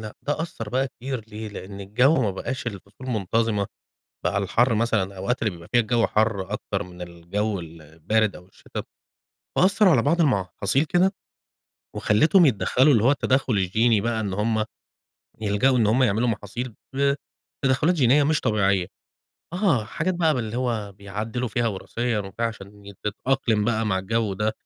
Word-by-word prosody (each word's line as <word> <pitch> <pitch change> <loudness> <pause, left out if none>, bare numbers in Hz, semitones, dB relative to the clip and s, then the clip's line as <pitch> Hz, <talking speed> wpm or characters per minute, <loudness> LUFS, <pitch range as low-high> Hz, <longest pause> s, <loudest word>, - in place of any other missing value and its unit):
لأ 110 -1 -8
ده 145 +2 -1
أثّر 115 -10 -6
بقى 130 +3 0
كتير 125 -3 -6
ليه؟ 110 0 -7
لأن 100 -1 -8
الجو 125 +11 +3
ما 105 - +1
بقاش 120 +6 -5
الفصول 100 +4 -8
منتظمة، 110 -1 0 0.6
بقى - - 0
الحَر 115 +5 +2
مثلًا 110 -2 +2
الأوقات 100 +6 -3
اللي 110 - +1
بيبقى 85 -1 -12
فيها 120 0 +5
الجو 115 +1 +1
حَر 105 -3 0
أكتر 100 -1 -3
من 90 -1 -12
الجو 90 +4 -3
البارد 80 +6 -2
أو 90 - -12
الشتا، 95 - -8 0.7
فأثر 195 +2 +5
على 130 -9 +4
بعض 165 +7 +2
المحاصيل 115 - +1
كده 180 +4 +3 0.8
وخليتهم 155 - +4
يتدّخلوا 130 +3 +3
اللي 110 -4 +3
هو 130 - +5
التدخل 135 -3 +1
الجيني 105 +3 +2
بقى 115 +1 -1
إن 100 -3 -2
هم 110 +2 0 0.8
يلجؤوا 110 +5 +2
إن 110 - +3
هم 120 +5 +3
يعملوا 115 +1 +2
محاصيل 115 +2 -4 0.9
بتدخلات 140 +6 +3
جينية 140 -1 +4
مش 150 +1 +2
طبيعية 100 -5 +2 0.7
آه، 175 - +2
حاجات 160 - -2
بقى 165 -3 +2
باللي 115 -3 -3
هو 115 -5 -2
بيعدلوا 105 +5 -4
فيها 115 +2 0
وراثيًا 115 +3 -2
وفيها 100 +3 -2
عشان 100 -2 -9
تتأقلم 110 0 0
بقى 110 -1 0
مع 95 -3 +1
الجو 105 +1 -1
ده، 105 +3 0
110 Hz, 160 wpm, -24 LUFS, 100-125 Hz, 0.9 s, فيها